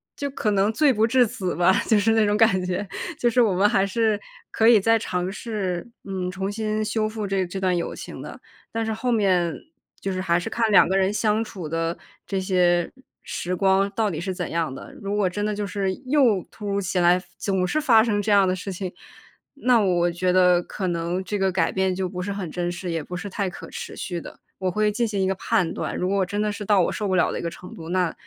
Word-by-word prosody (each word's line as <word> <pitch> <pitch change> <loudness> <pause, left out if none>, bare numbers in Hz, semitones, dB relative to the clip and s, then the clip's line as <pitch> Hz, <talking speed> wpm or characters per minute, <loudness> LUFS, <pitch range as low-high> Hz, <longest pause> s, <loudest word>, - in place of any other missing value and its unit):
就 280 - -3
可 235 -5 -1
能 200 +1 +2
罪 285 +4 +3
不 220 0 +2
至 250 +1 +4
死 190 -4 -3
吧， 180 +2 +4
就 220 - +4
是 225 +2 +2
那 220 -1 +4
种 205 +1 +2
感 215 -5 +4
觉， 185 +2 -2 0.3
就 240 - +2
是 245 +2 +3
我 220 -5 +3
们 195 +3 +4
还 200 -3 +2
是 215 0 +1 0.3
可 225 - +3
以 230 -2 +7
再 225 +3 +3
尝 180 -3 -2
试， 200 -3 -4
嗯， 185 -2 -3
重 190 +2 -3
新 215 0 -2
修 215 0 0
复 215 -1 -4
这 195 -1 0
这 190 +2 -5
段 185 -1 +1
友 170 - -3
情 - - -8
的。 - - -9 0.3
但 225 0 -2
是 220 - -1
后 245 +3 -1
面 185 -6 +2 0.4
就 195 - -3
是 185 0 -2
还 170 -2 +2
是 175 - -6
看 230 -2 0
2 200 - +7
个 190 - 0
人 190 +1 +2
相 215 +1 +1
处 190 -7 -7
的 165 +2 -2 0.3
这 195 - -1
些 180 -2 +2 0.3
时 180 +1 -3
光 195 +1 +3
到 215 -2 0
底 155 - -4
是 190 +1 -3
怎 180 -2 -4
样 165 -5 -1
的， - - -10
如 200 0 -2
果 205 -2 +2
真 205 +3 -3
的 210 - -1
就 205 0 -2
是 200 -1 -1
又 255 - +3
突 210 - -8
如 200 0 0
其 190 -1 -1
来 175 +1 +5 0.2
总 190 -2 0
是 310 +11 0
发 230 -7 +5
生 210 -3 0
这 210 - -1
样 200 -2 +5
的 185 - +1
事 195 +1 -6
情， 185 0 -5 0.6
那 250 -4 +3
我 175 -3 +2
觉 180 +1 0
得 180 -1 +5
可 190 +2 -5
能 175 +2 -2
这 205 +2 -3
个 190 0 +2
改 175 -3 +1
变 190 -1 0
就 190 -1 -1
不 180 0 -5
是 200 - -3
很 185 -5 -5
真 175 +1 -2
实， 175 0 -5
也 165 -1 -1
不 180 +4 -6
是 180 - -6
太 195 -1 -2
可 - - -10
持 - - -7
续 175 -2 -4
的， - - -11 0.2
我 185 -1 0
会 210 +2 +1
进 230 +2 0
行 200 -2 -2
一 190 - +2
个 190 - +1
判 180 -2 0
断。 - - -4
如 180 - -1
果 195 -1 +1
真 205 +3 -2
的 210 0 0
是 205 0 -6
到 200 -2 +4
我 - - +1
受 210 - -3
不 190 - +1
了 180 - +3
的 - - -3
一 - - -4
个 170 - -1
程 180 +2 -11
度， 160 0 -9
那 180 -1 +1
195 Hz, 270 characters per minute, -24 LUFS, 180-215 Hz, 0.6 s, 以